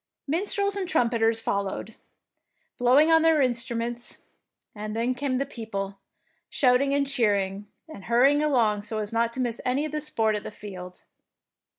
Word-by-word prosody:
Minstrels 400 Hz, +6 st, 0 dB
and 380 Hz, -3 st, -3 dB
trumpeters 230 Hz, -5 st, +2 dB
followed 200 Hz, 0 st, -2 dB
along, 225 Hz, -, -20 dB, 0.8 s
blowing 265 Hz, +6 st, +5 dB
on 325 Hz, 0 st, +6 dB
their 325 Hz, -1 st, +4 dB
instruments; 240 Hz, -2 st, -2 dB, 0.5 s
and 215 Hz, 0 st, -6 dB
then 235 Hz, +3 st, 0 dB
came 255 Hz, 0 st, -2 dB
the 275 Hz, -, -1 dB
people, 200 Hz, -6 st, -6 dB, 0.5 s
shouting 275 Hz, +1 st, +2 dB
and 285 Hz, 0 st, +2 dB
cheering, 205 Hz, -6 st, 0 dB, 0.2 s
and 310 Hz, -12 st, -11 dB
hurrying 270 Hz, +6 st, +4 dB
along 230 Hz, -8 st, +2 dB
so 220 Hz, +1 st, -5 dB
as 210 Hz, 0 st, -4 dB
not 230 Hz, 0 st, +1 dB
to 260 Hz, -, -6 dB
miss 240 Hz, -2 st, -2 dB
any 265 Hz, +4 st, 0 dB
of 310 Hz, -, -5 dB
the 305 Hz, 0 st, -3 dB
sport 225 Hz, -7 st, +1 dB
at 210 Hz, -, -4 dB
the -, -, -6 dB
field. 185 Hz, -4 st, -10 dB
240 Hz, 165 wpm, -26 LUFS, 215-280 Hz, 0.8 s, on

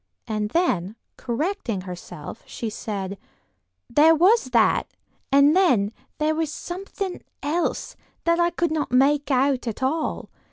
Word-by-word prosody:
And 215 Hz, -1 st, -2 dB
then, 220 Hz, -, 0 dB, 0.2 s
correcting 245 Hz, -, -2 dB
herself, 180 Hz, 0 st, -8 dB
she 225 Hz, -2 st, -5 dB
said: 200 Hz, -3 st, -5 dB, 0.7 s
"There 310 Hz, +6 st, +5 dB
was 380 Hz, -, +4 dB
that; 235 Hz, -3 st, +3 dB, 0.4 s
and 280 Hz, +3 st, +6 dB
then 245 Hz, -, +3 dB, 0.3 s
there 310 Hz, +1 st, +1 dB
was 315 Hz, -1 st, -1 dB
something 375 Hz, +2 st, -5 dB, 0.2 s
else 330 Hz, +4 st, -1 dB, 0.3 s
that 335 Hz, 0 st, +2 dB
I 345 Hz, 0 st, +4 dB
could 345 Hz, -1 st, -1 dB
not 305 Hz, -5 st, -1 dB
make 285 Hz, +3 st, +3 dB
out 265 Hz, -1 st, +2 dB
at 230 Hz, +3 st, -4 dB
all. 310 Hz, +5 st, -1 dB
280 Hz, 130 wpm, -24 LUFS, 225-335 Hz, 0.7 s, and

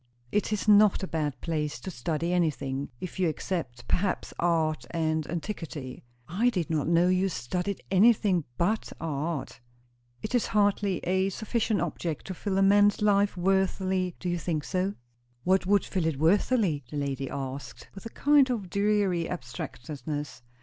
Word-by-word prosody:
"It 210 Hz, +1 st, 0 dB
is 210 Hz, 0 st, -2 dB
not 210 Hz, -2 st, +6 dB
a -, -, -2 dB
bad 150 Hz, -5 st, -2 dB
place 150 Hz, -3 st, -2 dB
to 190 Hz, -, -5 dB
study 165 Hz, +5 st, -2 dB
anything; 140 Hz, -5 st, -1 dB
if 185 Hz, +1 st, -7 dB
you 180 Hz, -3 st, +3 dB
except, 155 Hz, -8 st, -4 dB
perhaps, 185 Hz, 0 st, -1 dB
art 160 Hz, -2 st, +1 dB
and 160 Hz, -2 st, -1 dB
antiquity." 165 Hz, -7 st, -5 dB, 0.2 s
"I 210 Hz, +9 st, +2 dB
did 175 Hz, -7 st, -2 dB
not 155 Hz, -2 st, 0 dB
know 170 Hz, +1 st, +4 dB
you 185 Hz, +1 st, +2 dB
studied 180 Hz, +7 st, -3 dB
anything 195 Hz, -3 st, +4 dB
but 215 Hz, +6 st, 0 dB
art." 155 Hz, -2 st, -3 dB, 0.6 s
"It -, -, -4 dB
is 245 Hz, -, +2 dB
hardly 205 Hz, -2 st, +1 dB
a 190 Hz, +2 st, +2 dB
sufficient 220 Hz, 0 st, -1 dB
object 165 Hz, -2 st, -3 dB
to 190 Hz, -, -4 dB
fill 190 Hz, +2 st, -2 dB
a 195 Hz, -, +4 dB
man's 205 Hz, +1 st, +4 dB
life 205 Hz, -2 st, +3 dB
worthily; 190 Hz, 0 st, +1 dB
do -, -, -5 dB
you 175 Hz, 0 st, 0 dB
think 155 Hz, -2 st, -2 dB
so?" 190 Hz, +3 st, -1 dB, 0.5 s
"What 185 Hz, 0 st, +2 dB
would 205 Hz, +1 st, +3 dB
fill 180 Hz, -4 st, -1 dB
it 160 Hz, -4 st, -1 dB
worthily?" 175 Hz, -, +2 dB
the 150 Hz, -, -5 dB
lady 140 Hz, -2 st, -2 dB
asked, 135 Hz, -1 st, -6 dB
with 195 Hz, +3 st, -8 dB
a -, -, -9 dB
kind 285 Hz, +1 st, +4 dB
of 205 Hz, -8 st, -3 dB
dreary 200 Hz, -4 st, +1 dB
abstractedness. 145 Hz, 0 st, -6 dB
180 Hz, 160 wpm, -28 LUFS, 155-200 Hz, 0.6 s, not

